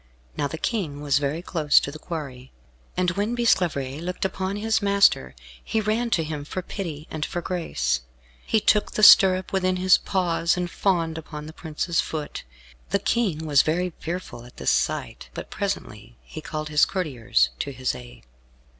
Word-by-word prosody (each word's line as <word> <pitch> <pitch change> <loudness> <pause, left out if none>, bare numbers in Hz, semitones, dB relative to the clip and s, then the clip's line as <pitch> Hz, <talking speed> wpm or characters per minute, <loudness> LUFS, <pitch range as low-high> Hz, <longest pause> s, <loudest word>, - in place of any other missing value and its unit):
Now 145 - 0
the 160 - -6
King 160 -8 -2
was 140 -1 +2
very 145 +4 -2
close 155 -5 +4
to 140 - -4
the 155 - -9
quarry, 140 -7 -7 0.5
and 180 -1 +2
when 205 +6 -1
Bisclavaret 165 - +1
looked 180 +2 -3
upon 190 +1 -2
his 220 +1 0
master, 200 - +3 0.3
he 220 - -1
ran 220 +3 0
to 180 -7 +1
him 150 -2 -5
for 185 +5 -5
pity 165 -6 -6
and 155 -1 -3
for 175 - -3
grace. 170 - -1 0.4
He 220 - +2
took 210 0 +2
the 215 - -1
stirrup 190 -2 +7
within 185 -1 +1
his 185 0 +5
paws, 175 -2 0
and 175 -1 -2
fawned 165 -5 0
upon 150 -1 -8
the 155 - -9
prince's 165 +1 -1
foot. 155 -2 -5 0.5
The - - +2
King 200 -6 0
was 145 -2 +5
very 175 +2 -1
fearful 170 -8 -5
at 125 - -15
this - - +1
sight, - - -1
but - - -7
presently 120 - -4
he 155 - -9
called 155 -1 -5
his 150 0 +4
courtiers 125 - +1
to 140 - -3
his 130 -1 -2
aid. - - -12
165 Hz, 175 wpm, -24 LUFS, 145-190 Hz, 0.5 s, stirrup